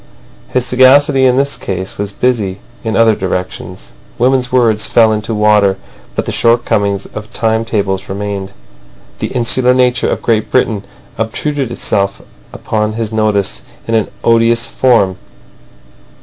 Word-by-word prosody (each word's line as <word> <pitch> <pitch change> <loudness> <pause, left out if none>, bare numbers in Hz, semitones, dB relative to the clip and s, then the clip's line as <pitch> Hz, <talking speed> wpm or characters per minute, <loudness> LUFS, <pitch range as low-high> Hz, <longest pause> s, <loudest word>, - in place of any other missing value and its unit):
His 125 -1 0
sagacity 130 +2 +4
in 125 0 +3
this 140 +1 0
case 95 0 -5
was 100 -1 -2
busy 105 -4 -1 0.3
in 110 -1 -2
other 115 -1 +4
directions. 90 -2 -5 0.3
Women's 125 0 +1
words 115 -4 +2
fell 110 -2 +4
into 110 +1 -3
water, 105 -2 +3 0.4
but - - -1
the - - -3
shortcomings 105 -4 +1
of 105 0 -9
time 110 0 0
tables 100 -3 -2
remained. 100 0 -4 0.7
The - - -2
insular 125 +1 +2
nature 125 -1 +2
of - - -3
Great 110 -2 +1
Britain 110 -5 0 0.3
obtruded 135 +4 -2
itself 100 -4 -1 0.3
upon 105 0 -2
his 115 -1 -3
notice 105 -3 0 0.3
in 115 - -2
an 110 -2 +2 0.2
odious 115 0 +3
form. 115 -6 +2
110 Hz, 135 wpm, -14 LUFS, 100-125 Hz, 0.7 s, sagacity